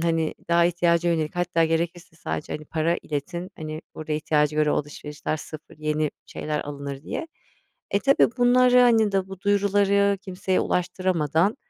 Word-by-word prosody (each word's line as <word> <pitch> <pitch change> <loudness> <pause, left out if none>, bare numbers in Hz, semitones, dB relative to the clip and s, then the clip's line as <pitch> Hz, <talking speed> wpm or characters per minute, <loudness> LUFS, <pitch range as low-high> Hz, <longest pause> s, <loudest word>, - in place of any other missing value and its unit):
hani, 165 -1 0
"Daha 170 0 +4
ihtiyaca 170 0 +2
yönelik 160 +1 -2
hatta 175 -1 +2
gerekirse 165 +1 -2
sadece, 155 - -4
hani, 155 - -5
para 165 +2 0
iletin, 170 +5 -4
hani, 155 0 -6
burada 155 0 -5
ihtiyaca 150 0 +1
göre 150 -1 +3
o - - +2
alışverişler 150 +1 -4
sıfır, 155 0 -10
yeni 155 0 0 0.2
şeyler 150 0 -3
alınır." 140 -1 -6
diye. 320 - -4 0.6
E, 200 - +2
tabii 275 +3 +4
bunları, 250 0 +5
hani, 225 -4 +4
da 190 -1 0
bu 195 -1 -9
duyuruları 200 0 +2
kimseye 185 0 -1
ulaştıramadan 180 - 0
170 Hz, 155 wpm, -24 LUFS, 155-195 Hz, 0.6 s, bunları